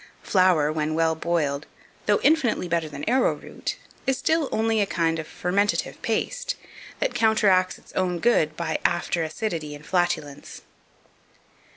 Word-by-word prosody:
Flour, 180 -6 +3
when 155 0 -1
well 165 0 +2
boiled, 155 -3 -1 0.4
though 205 -1 +4
infinitely 275 - +3
better 165 -2 -1
than 145 - -7
arrowroot, 255 +3 0 0.3
is 265 -1 +2
still 320 -3 +1
only 220 0 +1
a 200 - +1
kind 165 -2 0
of 155 - -5
fermentative 200 +4 -1
paste, - - -1 0.4
that - - -1
counteracts 210 -5 +3
its - - -19
own 180 -2 0
good 160 -7 +2
by 165 -2 -2
after 170 0 +1
acidity 160 -2 -3
and 145 +1 -13
flatulence. 175 -6 -2
175 Hz, 140 wpm, -25 LUFS, 160-220 Hz, 0.4 s, though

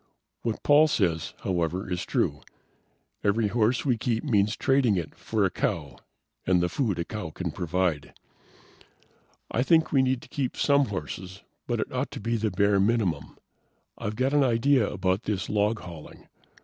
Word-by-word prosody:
What 115 -2 -3
Paul 150 +2 +6
says, 85 - 0
however, 90 +1 -1
is 90 -1 -3
true: - - 0 0.8
Every 105 +1 +2
horse 115 +3 +1
we 125 -5 +1
keep 115 -1 -1
means 105 -6 +2
trading 135 -7 +2
it 85 -3 -4
for 110 -3 -1
a 95 - 0
cow 75 -7 -2 0.5
and 90 -1 +3
the 90 0 +1
food 105 -1 -1
a 85 - -2
cow 105 -6 -5
can 85 +2 -4
provide. 85 -3 -1 1.4
"I 120 - +1
think 160 +3 +3
we 135 - +4
need 130 -1 0
to - - -13
keep 140 -5 -3
some 140 -1 +3
horses, 95 - -6 0.2
but - - -1
it - - -3
ought - - -1
to - - -6
be 115 +3 -1
the 110 -1 0
bare 100 -1 +2
minimum. 95 -8 0 0.6
I've 105 +1 -4
got 130 +4 0
an 145 -1 +4
idea 125 -1 +3
about 95 0 -1
this 100 -3 -2
log 105 0 +1
hauling. 85 -3 -11
105 Hz, 170 wpm, -27 LUFS, 90-120 Hz, 1.4 s, Paul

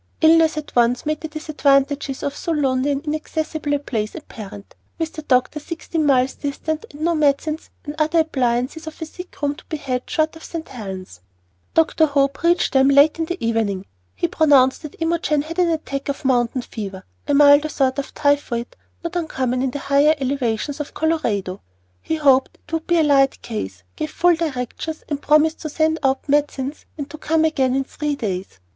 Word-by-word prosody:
Illness 320 0 +5
at 305 - -6
once 240 0 +3
made 305 0 -1
the 320 - -4
disadvantages 285 -3 0
of 285 - -2
so 335 - -3
lonely 270 -3 +1
and 285 +2 -2
inaccessible 310 -1 -2
a - - +2
place 220 -7 -3
apparent, 210 -10 -10 0.2
with 325 -1 -3
the 310 - -6
doctor 260 +1 +1
sixteen 320 0 -3
miles 260 -1 +3
distant, 310 +6 -4
and 290 - -12
no 340 +2 +2
medicines 305 +1 0 0.2
or 295 - -3
other 315 +2 +3
appliances 265 +1 -1
of 315 - -8
a 320 - -4
sick 360 +3 -11
room 285 0 +2
to 310 - -15
be 315 - -4
had 255 -3 -3
short 315 0 0
of 320 - -12
St. 330 -1 -6
Helen's. 190 - -8 0.5
Dr. 320 0 +4
Hope 275 -1 +1
reached 345 +1 +2
them 265 0 +5
late 285 +3 +5
in 325 - +1
the 350 +3 -4
evening. 210 -4 0 0.3
He 95 - 0
pronounced 275 -4 +4
that 305 - -10
Imogen 325 -3 +1
had 330 +3 -6
an 355 -1 +4
attack 290 -4 -3
of 280 +1 -4
"mountain 245 -1 +1
fever," 195 -5 -7 0.2
a 290 - +2
milder 290 +1 +6
sort 265 -2 +1
of 280 - -5
typhoid 285 -5 0 0.3
not 335 +1 -4
uncommon 260 -7 -1
in 265 - +1
the 255 - -4
higher 285 +2 +3
elevations 270 0 -1
of 295 - -6
Colorado. 225 - -1 0.4
He 320 - -2
hoped 275 -4 +3
it - - -16
would 325 -1 -2
be 345 - +3
a 325 - +4
light 275 -2 +3
case, 95 - -5
gave 155 - -3
full 350 0 +3
directions, 315 0 -4
and 290 -2 -2
promised 305 +2 +3
to 310 - -5
send 315 +2 +1
out 270 0 0
medicines 285 -1 0
and 285 -2 -4
to 310 - -9
come 320 +1 +2
again 265 -5 +1
in 270 - +1
three 295 +2 -3
days. 190 - -4
285 Hz, 190 wpm, -21 LUFS, 260-315 Hz, 0.5 s, milder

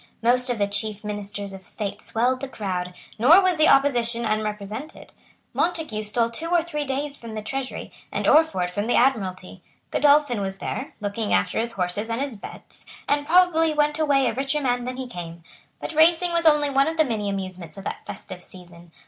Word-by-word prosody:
Most 250 +2 +3
of 245 - 0
the 205 - +2
chief 210 +1 -3
ministers 205 -1 -4
of 190 0 -10
state 200 +2 -5
swelled 250 +3 0
the 275 - -3
crowd; 180 -6 -4 0.2
nor 300 - +8
was 370 -3 +2
the 310 - +5
opposition 240 -4 +3
unrepresented. 215 +5 -4 0.4
Montague 320 -11 -1
stole 230 +2 0
two 320 +8 -4
or 345 -2 +3
three 300 -3 -3
days 280 +1 -3
from 230 -4 -9
the 215 - -5
Treasury, 270 +3 -4 0.2
and - - -2
Orford 295 - +4
from 205 +4 -2
the 245 - +2
Admiralty. 190 -7 0 0.3
Godolphin 285 -6 +3
was 195 0 -3
there, - - -5
looking 205 +1 -1
after - - 0
his 230 +1 -2
horses 195 +3 -2
and 230 +1 -2
his 275 -3 -3
bets, 200 - -10 0.2
and 290 0 +1
probably 325 -2 +4
went 295 +1 +1
away 280 -3 +3
a - - +1
richer 275 +3 -1
man 245 -3 0
than 255 0 -4
he 260 - -4
came. 170 -7 -8 0.4
But - - -5
racing 335 +3 +4
was 335 -1 +2
only 295 -2 +4
one 275 +1 +3
of 325 0 -2
the 315 - +4
many 215 -5 -2
amusements 185 -4 -5
of 195 - -8
that - - -5
festive 195 -3 -8
season. 175 -2 -15
235 Hz, 195 wpm, -24 LUFS, 205-290 Hz, 0.4 s, nor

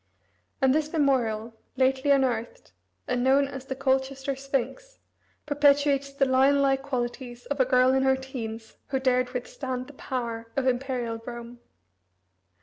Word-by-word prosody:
And 265 0 +5
this 305 0 0
memorial, 240 -7 +1 0.2
lately 265 +2 +2
unearthed, 255 -5 0 0.4
and 250 -1 0
known 275 +2 +4
as 270 -1 -8
the 265 - -4
Colchester 270 0 0
Sphinx, 275 - -3 0.5
perpetuates 285 -1 +3
the 275 0 +1
lion 265 +2 +4
like 270 -1 +2
qualities 245 -2 -4
of 285 0 -3
a 260 - +5
girl 255 0 +4
in 265 - +3
her 265 0 +4
teens, 230 -4 -7
who 265 - -1
dared 255 -1 +2
withstand 255 0 -4
the 290 - -13
power 235 -4 -4
of 270 - +1
Imperial 245 -3 -1
Rome. 235 0 -8
265 Hz, 145 wpm, -26 LUFS, 245-275 Hz, 0.5 s, And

